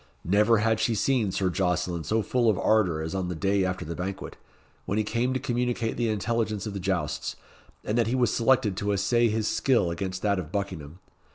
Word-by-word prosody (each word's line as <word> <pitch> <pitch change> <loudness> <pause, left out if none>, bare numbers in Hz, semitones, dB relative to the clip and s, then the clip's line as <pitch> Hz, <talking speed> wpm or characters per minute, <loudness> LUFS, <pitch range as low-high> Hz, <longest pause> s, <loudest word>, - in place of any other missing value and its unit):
Never 105 +5 +4
had 110 +1 +1
she 115 0 +1
seen 110 -2 +1
Sir 95 0 0
Jocelyn 90 -2 -1
so 110 +4 0
full 120 +3 +2
of 105 - +2
ardour 90 -8 +2
as 80 - -4
on 95 -2 -2
the 90 - -3
day 95 +4 +1
after 95 0 -2
the 85 - -4
banquet, 95 +3 -5 0.5
when 100 - -1
he 110 - +2
came 120 +4 0
to - - 0
communicate 120 -2 -1
the 120 -1 0
intelligence 110 -1 -1
of 105 - -4
the 100 - -4
jousts, 90 -5 -2 0.5
and 110 +3 0
that 115 - +2
he 120 - 0
was 120 -4 +2
selected 120 -4 +2
to 100 +1 0
essay 120 +5 +2
his 110 0 -1
skill 120 -10 +2
against 90 +2 -4
that 100 -2 +2
of 80 -3 -7
Buckingham. 90 -6 -4
105 Hz, 210 wpm, -27 LUFS, 95-115 Hz, 0.5 s, Never